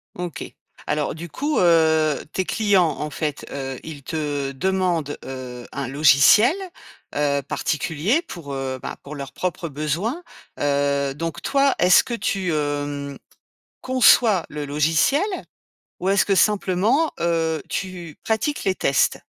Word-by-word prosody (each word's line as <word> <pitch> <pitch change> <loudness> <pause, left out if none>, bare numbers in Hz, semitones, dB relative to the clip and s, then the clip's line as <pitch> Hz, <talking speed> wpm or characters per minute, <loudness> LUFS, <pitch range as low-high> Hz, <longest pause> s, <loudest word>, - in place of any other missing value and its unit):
OK. 175 -5 -5 0.4
Alors, 150 -1 -1
du 170 +2 -7
coup, 290 - -1
heu, 160 -3 +4 0.2
tes 185 - -1
clients, 200 -5 +3
en 150 - -3
fait, 150 0 -4
heu, 135 -2 -5
ils 155 -3 -8
te 145 -3 -3
demandent, 175 -2 -1
heu, 125 -2 -7
un 140 -1 -3
logiciel, 150 - +6 0.6
heu, 145 -1 +1
particulier 160 - -1
pour, 170 - -8
heu, 135 -1 -3
bah, - - -5
pour 145 +2 -8
leurs 140 -2 -7
propres 180 -1 -3
besoins, 165 - -2 0.4
heu, 140 -1 +1
donc, 165 0 -4
toi, 275 -1 +2
est-ce 180 0 +6
que 240 - -5
tu, 195 -5 -1
hem, 145 -1 -3 0.6
conçois 235 -7 +4
le 150 -1 -5
logiciel? 155 - +2 0.8
Ou 185 - -3
est-ce 195 0 +4
que, 200 - +2
simplement, 210 - +2
heu, 165 -2 0
tu 175 -5 -5
pratiques 225 +7 -1
les 190 -1 +1
tests 140 - +1
160 Hz, 135 wpm, -22 LUFS, 145-190 Hz, 0.8 s, logiciel